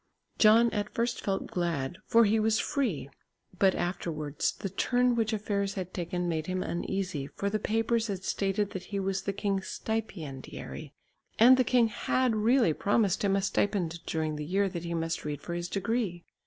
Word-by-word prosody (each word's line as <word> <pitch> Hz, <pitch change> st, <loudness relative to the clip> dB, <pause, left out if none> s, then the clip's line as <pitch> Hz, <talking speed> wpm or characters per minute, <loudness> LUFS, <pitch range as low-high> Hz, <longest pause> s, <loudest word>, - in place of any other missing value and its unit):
John 225 Hz, +2 st, +6 dB
at 205 Hz, -1 st, -2 dB
first 235 Hz, +1 st, 0 dB
felt 195 Hz, -1 st, -1 dB
glad, 170 Hz, -3 st, -2 dB
for 230 Hz, 0 st, +6 dB
he 215 Hz, +2 st, +3 dB
was 215 Hz, 0 st, +2 dB
free, 205 Hz, -, -1 dB, 0.5 s
but 190 Hz, -1 st, +4 dB
afterwards 155 Hz, -5 st, -2 dB
the 195 Hz, -, -5 dB
turn 245 Hz, +6 st, +2 dB
which 225 Hz, -1 st, +1 dB
affairs 200 Hz, -2 st, -1 dB
had 185 Hz, -1 st, -5 dB
taken 175 Hz, 0 st, -2 dB
made 160 Hz, -2 st, -2 dB
him 185 Hz, 0 st, -1 dB
uneasy, 175 Hz, -5 st, -3 dB
for 200 Hz, 0 st, -1 dB
the 215 Hz, -, 0 dB
papers 225 Hz, +2 st, +1 dB
had 195 Hz, -3 st, -4 dB
stated 200 Hz, +1 st, 0 dB
that 185 Hz, -1 st, -6 dB
he 200 Hz, +1 st, -3 dB
was 190 Hz, 0 st, -1 dB
the 200 Hz, -, -2 dB
king's 195 Hz, -1 st, -2 dB
stipendiary, 160 Hz, -9 st, -5 dB, 0.5 s
and 245 Hz, +3 st, +8 dB
the 255 Hz, -, +3 dB
king 240 Hz, -1 st, +3 dB
had 250 Hz, +2 st, +1 dB
really 225 Hz, -, +3 dB
promised 205 Hz, +2 st, +1 dB
him 195 Hz, -1 st, +3 dB
a 195 Hz, -, 0 dB
stipend 175 Hz, -5 st, 0 dB
during 155 Hz, -1 st, -1 dB
the 150 Hz, -, -4 dB
year 195 Hz, +6 st, +1 dB
that 175 Hz, -2 st, -6 dB
he 170 Hz, 0 st, -2 dB
must 165 Hz, 0 st, -2 dB
read 150 Hz, -2 st, -3 dB
for 170 Hz, -, -6 dB
his 175 Hz, 0 st, -3 dB
degree. 195 Hz, -3 st, -1 dB
195 Hz, 180 wpm, -29 LUFS, 170-220 Hz, 0.5 s, and